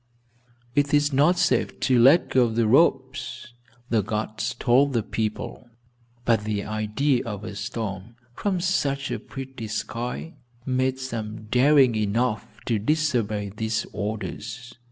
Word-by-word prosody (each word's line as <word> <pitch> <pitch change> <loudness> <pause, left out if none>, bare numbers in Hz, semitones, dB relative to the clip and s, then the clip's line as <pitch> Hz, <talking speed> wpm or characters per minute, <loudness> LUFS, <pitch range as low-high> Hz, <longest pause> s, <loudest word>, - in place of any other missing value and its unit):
"It 145 +1 +2
is 145 0 +2
not 150 +7 +4
safe - - +1
to 130 -2 +3
let 135 +8 +6
go 125 -2 +4
the 115 0 +1
ropes," 120 +2 +1 0.4
the 115 -2 +3
guards 110 +1 -3
told 135 +3 +3
the 115 -3 +1
people, 110 +3 -4 0.6
but 115 -3 +3
the 105 -1 -2
idea 110 +6 0
of 105 -3 -6
a 110 - -6
storm, 105 0 -5 0.2
from 190 +6 -1
such 140 -7 0
a - - -2
pretty 130 -4 -8
sky, 120 +8 -4 0.3
made 130 0 0
some 115 -4 -5
daring 135 0 +5
enough 110 +1 0 0.2
to 115 -3 +1
disobey 115 -6 0
these 110 0 -1
orders. 110 +4 -5
120 Hz, 135 wpm, -25 LUFS, 110-135 Hz, 0.6 s, let